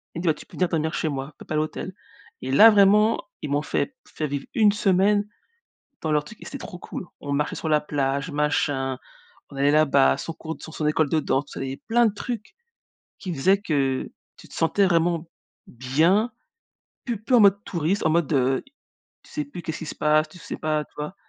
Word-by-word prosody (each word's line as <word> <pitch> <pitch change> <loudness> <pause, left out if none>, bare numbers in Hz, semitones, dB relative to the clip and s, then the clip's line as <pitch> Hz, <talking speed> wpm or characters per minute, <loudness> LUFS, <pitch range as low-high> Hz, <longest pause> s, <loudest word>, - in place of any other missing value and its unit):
elle - - -3
me 175 - -5
dit: - - -1
«Bah 160 - +5
tu 150 - -13
peux - - -16
venir 180 -2 +1
dormir 160 0 -1
chez 160 - -1
moi, 135 +1 -5
paie - - -12
pas 155 - -4
l'hôtel» 155 +4 -2 0.5
et 130 - -4
là, 210 +12 +9
vraiment, 210 +2 +5 0.2
ils 150 - -4
m'ont 145 +1 +1
fait 260 - -2
fait 155 - -4
vivre 140 -1 -4
une 215 -3 +5
semaine 205 0 +2 0.7
dans 160 - -2
leur 150 0 +2
truc 230 - -13
et - - -10
c'était 280 - -7
trop 180 - -8
cool. 180 - -7
On 145 - -4
marchait 145 +1 0
sur 160 - -4
la 150 -1 +3
plage, 140 +1 -1
machin, 145 -3 0 0.5
on 140 - -11
allait 140 +1 +3
là-bas, 140 - +4
son 165 - -5
cours 160 0 -7
sur 160 - -10
son 150 - -2
école 155 0 +2
de 160 - +2
danse, 140 -1 0
tout - - -14
ça - - -2
et 135 0 -5
plein 235 +1 +4
de 210 - +1
trucs, 230 - -6 0.7
qui 185 - -4
faisaient 190 +7 +3
que 135 -7 -1 0.3
tu - - -15
te - - -15
sentais 195 +5 +2
vraiment 170 -1 +1 0.4
bien, 160 - +2 0.7
plus 235 -4 -2
plus 250 - +3
en - - +6
mode 200 -1 +6
touriste, 175 +3 -1
en 160 - +4
mode, 170 -2 +1
heu, 130 -1 +2 0.6
tu - - -20
sais, 300 - -3
plus 275 -12 -9
qu'est-ce 160 0 -4
qu'il 160 - -7
se - - -6
passe, 155 0 +2
tu 180 - -15
sais - - -7
pas, 155 -1 -1
tu - - -32
vois? 150 +5 -5
160 Hz, 225 wpm, -24 LUFS, 145-195 Hz, 0.7 s, là